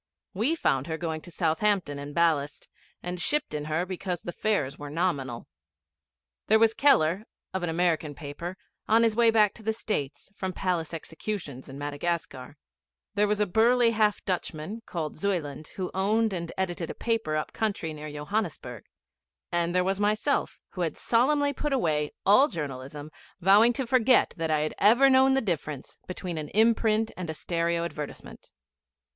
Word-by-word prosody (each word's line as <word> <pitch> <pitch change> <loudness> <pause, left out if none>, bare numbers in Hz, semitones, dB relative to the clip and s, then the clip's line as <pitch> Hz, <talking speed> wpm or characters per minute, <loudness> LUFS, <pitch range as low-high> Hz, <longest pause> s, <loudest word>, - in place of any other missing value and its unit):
We 230 - +1
found 135 - 0
her 160 -1 -3
going 160 -2 -3
to 175 - -11
Southampton 170 -2 0
in 145 +1 -7
ballast, 150 -3 0 0.4
and 180 0 -4
shipped 300 - 0
in 150 -1 -3
her 155 +3 -1
because 185 -1 -4
the 175 - -5
fares 175 -10 -1
were 145 0 -7
nominal. 145 -7 -2 1.0
There 220 - +6
was 225 0 +4
Keller, 195 - +3 0.3
of 190 - -2
an 175 - -2
American 165 -3 0
paper, 165 +5 -7 0.3
on 225 +2 +5
his 225 -2 +2
way 235 0 +5
back 215 -2 +4
to - - -13
the 220 +1 -1
States 195 -8 -4
from 190 -2 -3
palace 175 -5 -1
executions 160 -4 -6
in 135 - -8
Madagascar; 145 -1 -4 0.6
there 210 0 +2
was 210 0 0
a 210 - +3
burly 230 +4 +4
half 215 -2 +1
Dutchman, 180 +3 -3
called 160 -3 -4
Zuyland, 160 -7 -2
who 185 -2 -3
owned 215 +3 +1
and 170 -2 -4
edited 175 -3 -2
a - - -5
paper 225 -9 -1
up 155 - -3
country 200 -7 -2
near 150 0 -7
Johannesburg; 150 - -4 0.7
and 175 0 0
there 180 - +4
was 195 +1 -1
myself, 215 +7 +1
who 185 - -5
had 165 -2 -1
solemnly 285 +4 +2
put 295 +1 -2
away 150 - +1 0.2
all 210 +9 +6
journalism, 145 - -6 0.3
vowing 205 +6 +6
to 265 +1 -2
forget 250 0 +4
that 165 -3 -2
I 155 -1 +2
had 155 - -2
ever 245 +7 +6
known 265 0 +5
the 270 - +2
difference 155 - -4
between 180 -2 -4
an 150 - -6
imprint 220 0 +3
and 180 -3 -6
a 160 - -3
stereo 170 +1 -1
advertisement. 150 -3 -8
180 Hz, 170 wpm, -27 LUFS, 155-215 Hz, 1.0 s, There